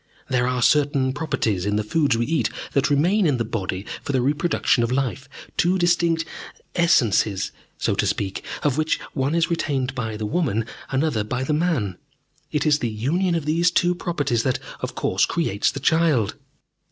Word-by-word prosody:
There 125 -1 +1
are 125 -1 0
certain 140 -2 +3
properties 140 - -1
in 105 +1 0
the 105 - +1
foods 140 +2 +1
we 120 - +1
eat 160 +4 +1 0.2
that 140 +1 +2
remain 175 +7 +3
in 140 -4 +2
the 115 - -1
body 95 -3 -3 0.2
for 140 - -4
the 130 - +2
reproduction 145 -2 +1
of 115 - -1
life, 135 +1 -2 0.3
two 180 +2 +3
distinct 170 -2 +2 0.5
Essences, 115 - +2 0.3
so - - 0
to - - 0
speak, 95 -1 -2 0.2
of 145 0 +1
which 155 0 +1
one 135 +3 0
is 170 0 +1
retained 135 -6 -1
by 110 -4 -3
the 105 - -3
woman, 115 - 0 0.2
another 135 -5 0
by 125 +5 -3
the 150 - 0
man. 150 - 0 0.5
It 150 0 0
is 150 -1 +4
the 120 - -1
union 165 - 0
of 165 -3 -2
these 165 +3 +3
two 175 0 +2
properties 145 -9 -1
that, 130 +1 0 0.2
of - - -5
course, - - +1
creates 110 - 0
the 140 - -5
child. 150 -7 +2
140 Hz, 180 wpm, -23 LUFS, 115-165 Hz, 0.5 s, is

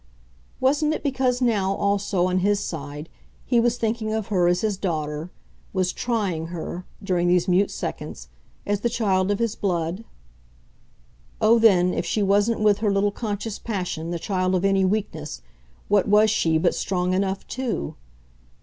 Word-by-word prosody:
Wasn't 295 +4 +2
it - - -6
because 260 -3 +1
now, 200 -5 +1
also, 200 -2 +1
on 185 0 +1
his 200 +2 +2
side, 150 -4 -6 0.4
he 240 -2 +3
was 235 +1 +2
thinking 225 -1 -1
of 220 -1 -2
her 180 -4 +2
as 175 0 +2
his 215 -2 0
daughter, 155 -3 -3 0.4
was 185 -2 0
TRYING 200 -9 -1
her, 175 +1 -6 0.2
during 180 -3 +1
these 175 0 +3
mute 185 +2 +3
seconds, - - -6 0.4
as 205 -1 0
the 235 - 0
child 200 -5 +1
of 205 - +1
his 230 -1 0
blood? 175 +1 -2 1.4
Oh 230 +2 +5
then, 180 -5 +5
if - - -1
she 205 +4 0
wasn't 205 +3 +2
with 210 -1 +4
her 210 -2 +1
little 200 +1 +2
conscious 210 0 -4
passion, 180 -7 -3
the 170 - -2
child 185 +1 0
of 185 +1 0
any 195 -1 +3
weakness, 185 -7 -2 0.4
what 205 -1 +3
was 210 +1 +5
she 165 -6 +2
but 160 - +2
strong 180 -1 -1
enough 190 0 -1
too? 245 - -3
195 Hz, 165 wpm, -24 LUFS, 180-220 Hz, 1.4 s, Oh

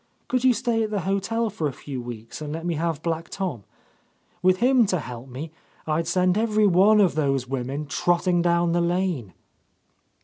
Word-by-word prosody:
Could 255 -1 0
you 260 - +6
stay 230 -1 0
at 220 - -1
the 205 -2 -1
hotel 200 +5 -1
for 160 -6 -2
a - - -3
few 130 -1 -6
weeks, 120 +2 -8
and 150 -1 -5
let 165 +2 -5
me 175 - 0
have 160 -1 -2
Black 165 0 -2
Tom? 180 - -4 0.8
With 185 0 +4
him 245 +1 +4
to 185 - +1
help 125 -2 -8
me, 145 +6 -7 0.3
I'd 160 +1 -1
send 180 +3 +2
every 215 -1 +2
one 200 +3 +5
of 195 -4 +4
those 135 -4 0
women 135 +3 -3
trotting 175 +4 +1
down 170 0 +2
the 175 +1 +2
lane." 170 - -1
170 Hz, 190 wpm, -24 LUFS, 150-200 Hz, 0.8 s, you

